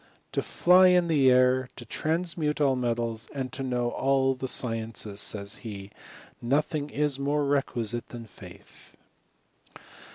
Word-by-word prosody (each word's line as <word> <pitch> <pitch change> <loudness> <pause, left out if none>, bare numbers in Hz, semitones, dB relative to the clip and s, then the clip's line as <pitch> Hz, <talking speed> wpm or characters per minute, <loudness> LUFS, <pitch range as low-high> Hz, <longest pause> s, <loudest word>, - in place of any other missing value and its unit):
" - - -38
To - - -1
fly 180 +1 +5
in 180 -1 +4
the 140 -5 +4
air, 130 0 +3
to 120 - -10
transmute 160 +3 -2
metals, 120 -5 0
and 130 -2 -4
to 135 - -5
know 125 -2 -1
all 135 0 +1
the 130 0 -5
sciences," 115 -4 -1
says 100 -1 0
he, 100 -3 -9 0.3
" - - -17 0.2
nothing 145 +4 0 0.3
more 145 +1 0
is - - -2
requisite.. 120 -4 -2
than 120 -1 -9
faith." 105 - -16
130 Hz, 140 wpm, -27 LUFS, 115-145 Hz, 0.3 s, fly